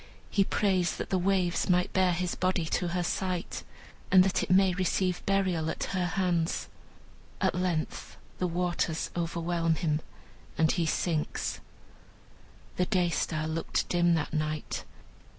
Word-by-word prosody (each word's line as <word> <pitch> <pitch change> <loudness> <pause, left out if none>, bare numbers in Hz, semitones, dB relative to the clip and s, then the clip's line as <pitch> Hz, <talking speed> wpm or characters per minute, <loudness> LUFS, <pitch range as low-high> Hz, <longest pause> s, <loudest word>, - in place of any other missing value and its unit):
He 200 - +4
prays 190 -3 +1
that - - -5
the 190 - +2
waves 185 -1 +1
may 180 0 +4
bear 185 -2 +3
his 175 0 -1
body 185 -2 0
to 175 +2 0
her 175 +1 -1
sight, 180 0 -2 0.5
and 185 0 +7
that 190 -1 +1
it - - -3
may 185 0 +5
receive 185 0 0
burial 185 -5 +1
at - - -3
her 180 -2 +1
hands. 175 -2 0 0.7
At 190 - +2
length 175 -3 -2 0.2
the 180 - +1
waters 175 -2 -1
overwhelm 170 -1 0
him, 155 -3 0 0.6
and 160 -1 +4
he 170 -3 0
sinks. 160 -1 -1 1.2
The 180 - +1
Day 180 -4 +2
star 155 -1 -1
looked 160 +1 -1
dim 175 -1 +3
that 155 -2 -2
night. 155 -1 -2
175 Hz, 145 wpm, -29 LUFS, 165-185 Hz, 1.2 s, and